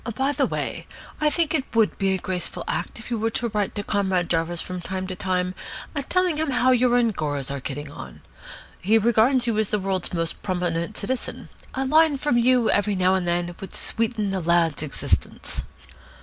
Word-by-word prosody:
By 270 +4 +1
the - - +1
way, - - -4 0.3
I 305 - +3
think 320 +2 +1
it 275 -6 -2
would 225 -2 +3
be 195 -1 +2
a - - 0
graceful 180 -1 -3
act - - -3
if 230 +1 -9
you 230 - 0
were 225 +1 +1
to 235 - -1
write 210 -2 -1
to 205 - -2
Comrade 190 -4 0
Jarvis 165 +1 0
from 180 +1 -4
time 185 +1 -4
to 185 0 -5
time 185 -1 -1 0.6
telling 365 -3 +2
him 315 -1 0
how 255 0 +3
your 250 -1 +4
Angoras 150 - 0
are 140 - -3
getting 145 +2 -6
on. 65 - -10 0.6
He 215 +5 +4
regards 235 +3 +3
you 225 -3 +1
as 220 - +1
the 210 - +1
World's 190 -2 -1
Most 165 -2 -2
Prominent 175 0 -2
Citizen. 245 +5 -4 0.3
A 265 +1 0
line 310 +1 +4
from 260 -3 +2
you 245 -1 +4
every 205 0 +2
now 185 0 +3
and 185 -2 0
then 175 0 0
would 195 - -6
sweeten 225 -3 0
the 190 -1 -1
lad's 165 -3 +2
existence." 155 -3 -2
200 Hz, 195 wpm, -24 LUFS, 175-240 Hz, 0.6 s, your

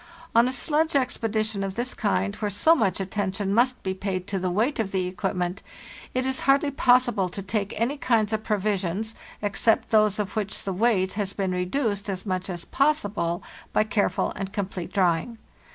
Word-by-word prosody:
On 235 +2 +5
a - - 0
sledge 310 +4 +1
expedition 220 -5 0
of 195 -1 -4
this 245 +2 -2
kind, 100 - 0
where 210 - -1
so 205 - +4
much 220 - +1
attention 195 0 -1
must 245 +3 +2
be 190 - -1
paid 190 -1 -3
to 195 -1 -2
the 185 0 -1
weight 225 +11 0
of 205 -3 -1
the 185 -1 0
equipment, 185 0 -2 0.5
it 255 0 +1
is 265 0 0
hardly 280 +1 +4
possible 245 -7 +3
to 195 +2 -6
take 205 +1 -2
any 250 +6 0
kinds 225 -5 +1
of 215 0 -1
provisions, 205 0 -1 0.3
except 205 +2 +2
those 215 -2 +4
of 210 -2 -3
which 210 -2 -2
the 195 - -2
weight 190 -2 +2
has 200 -2 -2
been 190 -2 -1
reduced 200 +3 -1
as 190 0 -4
much 185 -1 -2
as 175 -2 -5
possible 205 - 0 0.3
by - - +4
careful 215 -1 0
and 195 -1 -4
complete 190 -3 -4
drying. 185 +4 +1
205 Hz, 185 wpm, -25 LUFS, 190-230 Hz, 0.5 s, On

